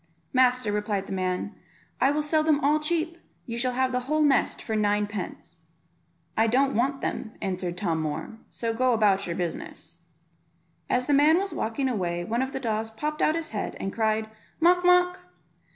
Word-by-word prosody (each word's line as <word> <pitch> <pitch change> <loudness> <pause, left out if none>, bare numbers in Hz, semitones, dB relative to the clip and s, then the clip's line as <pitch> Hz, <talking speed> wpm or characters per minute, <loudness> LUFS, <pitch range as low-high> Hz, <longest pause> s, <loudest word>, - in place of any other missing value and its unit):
"Master," 255 -3 +3
replied 205 -1 -1
the - - -10
man, 185 +2 -2 0.5
"I 265 - +4
will 300 +1 0
sell 310 +1 +2
them 310 -2 +3
all 295 +2 +3
cheap; 330 +2 -1 0.3
you 230 - -5
shall 250 +1 0
have 260 +1 +1
the 250 - 0
whole 310 0 +3
nest 285 -2 +2
for 220 - -3
nine 210 -1 +2
pence." 205 -3 -7 0.8
"I 225 +1 +3
don't 270 +4 +2
want 270 +4 0
them," 220 - -3
answered 185 -2 -3
Tom 170 -4 -1
Moor, 155 +8 -4
"so 230 -1 -3
go 255 +2 +2
about 205 -4 +2
your 170 - -3
business." 175 -2 -5 0.9
As 250 0 +1
the 290 - +1
man 300 +4 +5
was 390 +1 -2
walking 230 +5 -1
away 175 -8 -1
one 230 +6 -1
of 265 0 -2
the 270 - -4
daws 220 -3 -2
popped 300 +7 -4
out 310 - +3
his 330 -1 -3
head, 215 - -4
and 195 - -3
cried 220 -1 0 0.3
"Mawk, 355 +2 +4
mawk." 360 0 +4
240 Hz, 185 wpm, -26 LUFS, 210-290 Hz, 0.9 s, man